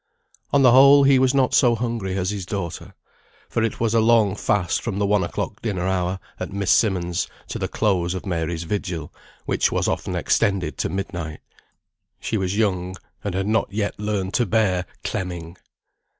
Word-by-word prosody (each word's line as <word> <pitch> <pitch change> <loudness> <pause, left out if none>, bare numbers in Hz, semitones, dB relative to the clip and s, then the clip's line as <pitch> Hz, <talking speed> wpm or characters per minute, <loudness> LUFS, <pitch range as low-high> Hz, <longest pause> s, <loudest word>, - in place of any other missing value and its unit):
On 140 -1 +4
the 125 - +7
whole 140 +2 +8
he 135 -1 +5
was 130 +1 +3
not 130 -2 +2
so 120 -3 +4
hungry 115 -5 -3
as 95 +1 -1
his 100 -2 -4
daughter. 90 -2 -5 0.5
For 115 - -1
it 115 -1 -1
was 115 -1 +1
a 115 - +4
long 110 -3 +4
fast 100 -5 0
from 110 -5 -3
the 100 - +1
one 100 -1 +2
o'clock - - -4
dinner 95 -6 -2
hour 95 0 -1 0.2
at - - -5
Miss 100 -1 0
Simmonds' 90 -5 +1 0.2
to - - -4
the - - -1
close 95 -4 0
of 95 - -6
Mary's 85 -2 -2
vigil, 85 -4 -4 0.3
which - - +1
was - - 0
often - - -2
extended 100 -3 +1
to - - 0
midnight. 90 -5 -5 0.8
She - - -3
was 95 -1 -1
young, 95 -4 0 0.3
and 100 -3 -3
had 95 0 -1
not 110 +2 0
yet 100 0 -2
learned 105 -2 -2
to 120 - +1
bear 95 -4 +1 0.2
"clemming." 85 -2 -4
100 Hz, 180 wpm, -22 LUFS, 90-110 Hz, 0.8 s, whole